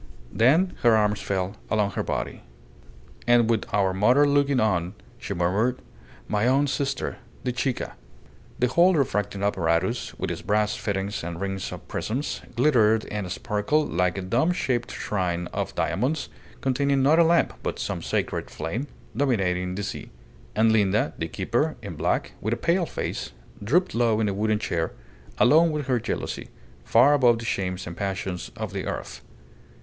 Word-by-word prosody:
Then 155 Hz, +11 st, +4 dB
her 115 Hz, -2 st, +5 dB
arms 105 Hz, -1 st, +1 dB
fell 95 Hz, -1 st, -2 dB
along 105 Hz, -2 st, +1 dB
her -, -, -2 dB
body. -, -, -3 dB, 0.9 s
"And 120 Hz, -1 st, +5 dB
with 110 Hz, -, -1 dB
our 95 Hz, -2 st, +2 dB
mother 125 Hz, +9 st, +4 dB
looking 140 Hz, -2 st, +3 dB
on," 90 Hz, -4 st, 0 dB, 0.2 s
she -, -, -4 dB
murmured. 100 Hz, +9 st, +1 dB, 0.5 s
"My 105 Hz, +2 st, +1 dB
own 135 Hz, +3 st, +4 dB
sister 140 Hz, -1 st, -2 dB, 0.2 s
the 125 Hz, -, 0 dB
Chica!" 125 Hz, +1 st, -2 dB, 0.6 s
The 125 Hz, -, +2 dB
whole 175 Hz, +7 st, +5 dB
refracting 105 Hz, -, 0 dB
apparatus, 95 Hz, +3 st, 0 dB
with -, -, -2 dB
its -, -, -5 dB
brass 105 Hz, +3 st, +1 dB
fittings 100 Hz, -3 st, -3 dB
and 85 Hz, 0 st, -5 dB
rings 95 Hz, -1 st, -3 dB
of -, -, -9 dB
prisms, 130 Hz, +7 st, -3 dB
glittered 115 Hz, -5 st, +4 dB
and 105 Hz, -4 st, -3 dB
sparkled 120 Hz, +9 st, 0 dB
like 90 Hz, +2 st, +1 dB
a 95 Hz, -, -3 dB
domeshaped 120 Hz, -, 0 dB
shrine 90 Hz, -4 st, -2 dB
of -, -, -3 dB
diamonds, 130 Hz, -, -1 dB, 0.3 s
containing 135 Hz, +1 st, +1 dB
not 155 Hz, +4 st, +5 dB
a -, -, +8 dB
lamp, 170 Hz, +1 st, +3 dB
but -, -, -3 dB
some -, -, -3 dB
sacred -, -, -2 dB
flame, 115 Hz, -, -4 dB, 0.3 s
dominating 90 Hz, -9 st, 0 dB
the 100 Hz, -, -3 dB
sea. -, -, -5 dB, 0.5 s
And 110 Hz, +1 st, +4 dB
Linda, 110 Hz, +4 st, +2 dB
the 80 Hz, -, -1 dB
keeper, -, -, -1 dB
in -, -, -5 dB
black, -, -, 0 dB
with 110 Hz, +3 st, 0 dB
a -, -, -9 dB
pale 170 Hz, 0 st, +1 dB
face, -, -, -4 dB, 0.3 s
drooped 175 Hz, -, +2 dB
low 115 Hz, -2 st, +2 dB
in 110 Hz, -, +1 dB
a 100 Hz, -, 0 dB
wooden 105 Hz, +2 st, +1 dB
chair, 80 Hz, -5 st, -2 dB, 0.4 s
alone 160 Hz, +6 st, +5 dB
with 150 Hz, -2 st, -2 dB
her 125 Hz, -2 st, +1 dB
jealousy, 115 Hz, -, -4 dB, 0.3 s
far 100 Hz, -, +5 dB
above 125 Hz, -5 st, +5 dB
the 115 Hz, -, -7 dB
shames 90 Hz, -3 st, -2 dB
and 85 Hz, -, -7 dB
passions 95 Hz, -8 st, -3 dB
of -, -, -4 dB
the -, -, -3 dB
earth. -, -, -5 dB
110 Hz, 165 wpm, -25 LUFS, 95-135 Hz, 0.9 s, a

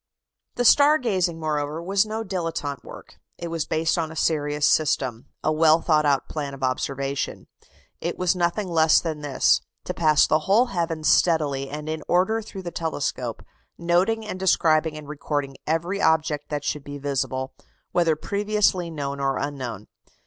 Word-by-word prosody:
The 245 Hz, -, 0 dB
star 290 Hz, +5 st, +6 dB
gazing, 185 Hz, -, -1 dB
moreover, 150 Hz, -1 st, -2 dB
was 195 Hz, +4 st, +1 dB
no 220 Hz, +1 st, -3 dB
dilettante 165 Hz, -8 st, -3 dB
work; -, -, -12 dB, 0.2 s
it 170 Hz, -, -5 dB
was 165 Hz, -2 st, -3 dB
based 160 Hz, +2 st, +1 dB
on 160 Hz, -1 st, -2 dB
a -, -, -9 dB
serious 150 Hz, -2 st, +1 dB
system 130 Hz, -6 st, +1 dB, 0.2 s
a 155 Hz, -, +2 dB
well 155 Hz, +1 st, +5 dB
thought 155 Hz, -3 st, +2 dB
out 140 Hz, -2 st, +1 dB
plan 145 Hz, -3 st, -4 dB
of 135 Hz, -, -10 dB
observation. 135 Hz, +2 st, -2 dB, 0.5 s
It -, -, -3 dB
was 185 Hz, 0 st, +1 dB
nothing 180 Hz, +3 st, 0 dB
less 160 Hz, -2 st, +4 dB
than 160 Hz, -3 st, -4 dB
this 145 Hz, -2 st, +2 dB, 0.2 s
to -, -, -4 dB
pass 155 Hz, -3 st, +4 dB
the 155 Hz, -, +2 dB
whole 225 Hz, +6 st, +5 dB
heavens 165 Hz, -3 st, -1 dB
steadily 145 Hz, -5 st, +2 dB
and 150 Hz, +2 st, -6 dB
in 155 Hz, 0 st, -3 dB
order 190 Hz, +6 st, +2 dB
through 195 Hz, -3 st, -9 dB
the 175 Hz, -, -5 dB
telescope, 160 Hz, -4 st, -3 dB, 0.3 s
noting 180 Hz, +6 st, +1 dB
and 185 Hz, -3 st, -5 dB
describing 160 Hz, -4 st, +2 dB
and 150 Hz, -1 st, -10 dB
recording 145 Hz, -2 st, -3 dB
every 170 Hz, +5 st, -1 dB
object 160 Hz, -2 st, +1 dB
that 145 Hz, -1 st, -3 dB
should 150 Hz, -1 st, -3 dB
be 145 Hz, 0 st, -7 dB
visible, 130 Hz, -2 st, -2 dB, 0.4 s
whether 170 Hz, -3 st, +2 dB
previously 200 Hz, -1 st, 0 dB
known 140 Hz, -3 st, -4 dB
or 135 Hz, -1 st, 0 dB
unknown. 130 Hz, -7 st, -5 dB
160 Hz, 165 wpm, -24 LUFS, 145-175 Hz, 0.5 s, star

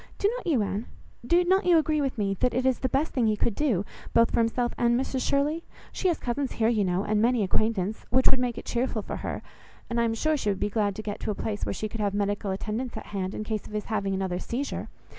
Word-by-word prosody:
Do 400 Hz, -, +2 dB
not -, -, -6 dB
you, 270 Hz, -10 st, +3 dB
Anne? 205 Hz, +3 st, -3 dB, 0.4 s
Do 345 Hz, +9 st, +4 dB
not 380 Hz, +3 st, +4 dB
you 345 Hz, -2 st, +7 dB
agree 310 Hz, -1 st, +2 dB
with 270 Hz, -3 st, -1 dB
me, 200 Hz, -2 st, +1 dB
that 250 Hz, -, +1 dB
it 255 Hz, +1 st, +1 dB
is 260 Hz, -2 st, +3 dB
the 260 Hz, -, 0 dB
best 290 Hz, +5 st, 0 dB
thing 240 Hz, -4 st, +2 dB
he 215 Hz, -1 st, +2 dB
could 230 Hz, -, +1 dB
do, 215 Hz, -8 st, +1 dB, 0.3 s
both 230 Hz, 0 st, +5 dB
for -, -, +1 dB
himself 235 Hz, +1 st, +1 dB
and 240 Hz, 0 st, +3 dB
Mrs 265 Hz, 0 st, -1 dB
Shirley? 295 Hz, +5 st, +1 dB, 0.3 s
She 380 Hz, -, -1 dB
has 340 Hz, -3 st, +2 dB
cousins 260 Hz, +2 st, -2 dB
here, 225 Hz, 0 st, +2 dB
you 220 Hz, -3 st, +2 dB
know, 185 Hz, +1 st, +1 dB
and 210 Hz, 0 st, +1 dB
many 235 Hz, -1 st, +3 dB
acquaintance, 215 Hz, +1 st, 0 dB
which 260 Hz, +2 st, +4 dB
would 265 Hz, -, +2 dB
make 245 Hz, -2 st, -1 dB
it -, -, -7 dB
cheerful 235 Hz, -3 st, -1 dB
for -, -, -4 dB
her, -, -, -4 dB, 0.5 s
and 235 Hz, 0 st, +2 dB
I -, -, +3 dB
am 225 Hz, -1 st, 0 dB
sure 310 Hz, +7 st, +2 dB
she 240 Hz, -8 st, -1 dB
would 195 Hz, -2 st, 0 dB
be 205 Hz, -, 0 dB
glad 205 Hz, -2 st, +1 dB
to 215 Hz, -, -6 dB
get 205 Hz, -1 st, -4 dB
to -, -, -4 dB
a 210 Hz, -, 0 dB
place 210 Hz, 0 st, -3 dB
where -, -, -1 dB
she 215 Hz, -, -3 dB
could 215 Hz, +1 st, -5 dB
have 200 Hz, -1 st, 0 dB
medical 205 Hz, 0 st, 0 dB
attendance 215 Hz, +6 st, -3 dB
at -, -, -6 dB
hand, 190 Hz, -1 st, -2 dB
in -, -, -3 dB
case 215 Hz, -1 st, -3 dB
of -, -, -12 dB
his 210 Hz, 0 st, -2 dB
having 200 Hz, -2 st, 0 dB
another 190 Hz, -2 st, -1 dB
seizure. 260 Hz, +8 st, -3 dB
230 Hz, 275 wpm, -27 LUFS, 205-260 Hz, 0.5 s, you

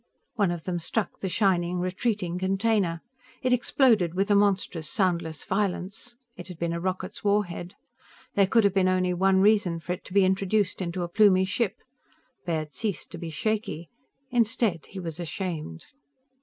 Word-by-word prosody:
One 205 Hz, -6 st, +1 dB
of 175 Hz, -2 st, -4 dB
them 175 Hz, -2 st, -2 dB
struck 195 Hz, +4 st, -2 dB
the 190 Hz, -, -3 dB
shining, 180 Hz, -3 st, +1 dB
retreating 185 Hz, 0 st, -1 dB
container. 190 Hz, -3 st, +1 dB, 0.4 s
It 255 Hz, 0 st, +3 dB
exploded 230 Hz, -, +3 dB
with 195 Hz, +3 st, +1 dB
a -, -, +6 dB
monstrous, 190 Hz, -6 st, +1 dB
soundless, 170 Hz, -6 st, 0 dB
violence. 195 Hz, +4 st, -2 dB, 0.2 s
It 180 Hz, 0 st, -9 dB
had 180 Hz, -3 st, -9 dB
been 170 Hz, 0 st, -1 dB
a 170 Hz, -, -2 dB
rocket's 185 Hz, +1 st, -4 dB
war 205 Hz, 0 st, +3 dB
head. 175 Hz, +1 st, -8 dB, 0.6 s
There 200 Hz, -1 st, +4 dB
could 225 Hz, +3 st, +4 dB
have 200 Hz, -2 st, +3 dB
been 190 Hz, -1 st, +3 dB
only 185 Hz, -1 st, +2 dB
one 190 Hz, +1 st, +3 dB
reason 200 Hz, -5 st, +3 dB
for 175 Hz, +2 st, -3 dB
it 180 Hz, -, -8 dB
to -, -, -10 dB
be 200 Hz, -1 st, +6 dB
introduced 195 Hz, +1 st, +1 dB
into 175 Hz, 0 st, -2 dB
a -, -, -2 dB
Plumie 190 Hz, 0 st, +4 dB
ship. 200 Hz, +1 st, -1 dB, 0.7 s
Baird 155 Hz, -3 st, -2 dB
ceased 210 Hz, -5 st, -3 dB
to 170 Hz, -, -7 dB
be 170 Hz, -1 st, -5 dB
shaky. 175 Hz, -2 st, -2 dB, 0.4 s
Instead, 230 Hz, -7 st, +1 dB
he 195 Hz, -, -8 dB
was 165 Hz, -2 st, -6 dB
ashamed. 165 Hz, -, -5 dB
185 Hz, 170 wpm, -26 LUFS, 175-205 Hz, 0.7 s, a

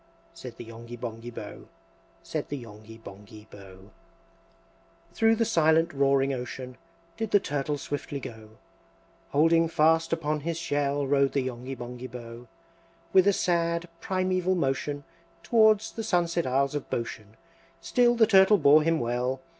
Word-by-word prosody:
Said 125 Hz, -3 st, -10 dB
the -, -, -8 dB
Yonghy 115 Hz, +1 st, -10 dB
Bonghy 115 Hz, 0 st, -7 dB
Bò, -, -, -9 dB, 0.6 s
Said -, -, -4 dB
the 145 Hz, -, -3 dB
Yonghy 110 Hz, -1 st, -12 dB
Bonghy 105 Hz, +1 st, -13 dB
Bò. 95 Hz, -2 st, -13 dB
IX. 105 Hz, -, -20 dB, 1.2 s
Through 225 Hz, +4 st, +3 dB
the 230 Hz, +1 st, +1 dB
silent 165 Hz, -3 st, +2 dB
roaring 135 Hz, 0 st, +2 dB
ocean 125 Hz, 0 st, -6 dB, 0.4 s
Did 225 Hz, -2 st, -3 dB
the 205 Hz, -, +5 dB
Turtle 145 Hz, -3 st, -2 dB
swiftly 145 Hz, +1 st, -5 dB
go; 110 Hz, -3 st, -11 dB, 0.7 s
Holding 165 Hz, +3 st, +3 dB
fast 165 Hz, +1 st, +2 dB
upon 155 Hz, -2 st, -1 dB
his 165 Hz, +2 st, -3 dB
shell 145 Hz, -4 st, -1 dB
Rode 140 Hz, 0 st, +2 dB
the 140 Hz, -, +1 dB
Yonghy 130 Hz, +1 st, -5 dB
Bonghy 125 Hz, +1 st, -7 dB
Bò. 120 Hz, 0 st, -10 dB, 0.7 s
With 190 Hz, 0 st, +5 dB
a -, -, +6 dB
sad 170 Hz, -1 st, 0 dB
primaeval 185 Hz, -1 st, 0 dB
motion 145 Hz, -2 st, -2 dB, 0.4 s
Towards 220 Hz, -2 st, +3 dB
the 225 Hz, -, -6 dB
sunset 170 Hz, -4 st, 0 dB
isles 135 Hz, +2 st, +1 dB
of 145 Hz, -, -5 dB
Boshen 110 Hz, -2 st, -5 dB, 0.4 s
Still 240 Hz, +8 st, +2 dB
the 230 Hz, -1 st, +5 dB
Turtle 200 Hz, -1 st, +6 dB
bore 150 Hz, -2 st, +6 dB
him 165 Hz, +1 st, +1 dB
well. 125 Hz, +2 st, -1 dB
145 Hz, 145 wpm, -27 LUFS, 120-170 Hz, 1.2 s, a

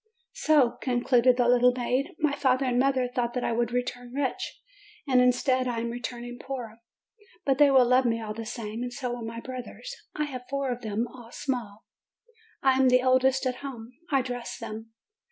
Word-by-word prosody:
"So," 290 Hz, -6 st, +3 dB
concluded 245 Hz, 0 st, +3 dB
the 245 Hz, -1 st, +3 dB
little 250 Hz, 0 st, +5 dB
maid, 255 Hz, +3 st, -1 dB
"my 300 Hz, -2 st, +1 dB
father 265 Hz, -1 st, +2 dB
and 245 Hz, -1 st, +1 dB
mother 260 Hz, -1 st, +2 dB
thought 245 Hz, -1 st, -2 dB
that 250 Hz, -, -1 dB
I -, -, 0 dB
would 235 Hz, 0 st, 0 dB
return 245 Hz, 0 st, -3 dB
rich, 275 Hz, -2 st, -3 dB, 0.5 s
and 255 Hz, -2 st, +5 dB
instead 255 Hz, +1 st, +2 dB
I 240 Hz, -2 st, -2 dB
am 235 Hz, 0 st, -3 dB
returning 245 Hz, 0 st, -6 dB
poor. 240 Hz, -5 st, -6 dB, 0.7 s
But 270 Hz, -1 st, +2 dB
they 290 Hz, -1 st, +7 dB
will 260 Hz, -2 st, +6 dB
love 250 Hz, +1 st, +4 dB
me 230 Hz, -1 st, +1 dB
all 215 Hz, -1 st, -5 dB
the 225 Hz, 0 st, -6 dB
same. 225 Hz, -1 st, -5 dB
And 245 Hz, 0 st, -3 dB
so 250 Hz, 0 st, -4 dB
will 245 Hz, -, -6 dB
my 230 Hz, +1 st, -5 dB
brothers. 255 Hz, -, -7 dB, 0.2 s
I 300 Hz, -, 0 dB
have 255 Hz, -4 st, -6 dB
four, 275 Hz, -2 st, -1 dB, 0.3 s
all 240 Hz, -1 st, -13 dB
small. 235 Hz, -7 st, -4 dB, 0.8 s
I 265 Hz, -1 st, +4 dB
am 260 Hz, -1 st, +5 dB
the 250 Hz, 0 st, +4 dB
oldest 260 Hz, +1 st, +3 dB
at 255 Hz, -1 st, -1 dB
home. 250 Hz, -4 st, -8 dB, 0.2 s
I 275 Hz, -3 st, +2 dB
dress 245 Hz, -2 st, -5 dB
them. 225 Hz, 0 st, -7 dB
250 Hz, 190 wpm, -27 LUFS, 240-260 Hz, 0.8 s, they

